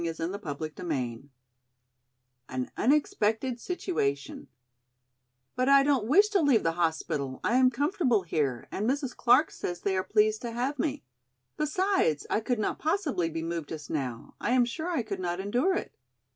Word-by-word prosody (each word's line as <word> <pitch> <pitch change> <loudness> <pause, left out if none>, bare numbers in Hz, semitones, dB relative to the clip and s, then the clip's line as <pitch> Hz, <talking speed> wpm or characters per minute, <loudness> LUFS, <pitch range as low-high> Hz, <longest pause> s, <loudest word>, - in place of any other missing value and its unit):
CHAPTER 165 +4 -3 0.4
VII 135 -6 -3 1.2
An 130 -1 -3
Unexpected 245 -3 +1
Situation 145 - -2 1.1
"BUT 255 +1 +1
I 275 0 +7
don't 275 -6 +2
wish 400 - +6
to 400 -4 +2
leave 275 -7 +4
the 165 - +2
hospital, 160 -5 -1
I 235 - +2
am 255 -1 +6
comfortable 255 - +1
here 145 -8 -1
and 215 +4 -1
Mrs. 270 -2 -1
Clark 260 +6 +4
says 175 0 -5
they 195 -1 0
are 185 - 0
pleased 215 +1 +2
to 235 -1 -5
have 260 +4 -2
me. 295 -1 -1 0.5
Besides 305 - +1
I - - +3
could 245 +2 -1
not 215 - -2
possibly 305 - 0
be 165 0 -4
moved 165 -2 -4
just 155 -2 -7
now, 130 -6 -4
I 245 - +1
am 250 -1 +4
sure 315 +8 -4
I 325 -9 0
could - - -5
not 175 0 -2
endure 245 - +1
it." - - -4
220 Hz, 160 wpm, -28 LUFS, 165-275 Hz, 1.2 s, I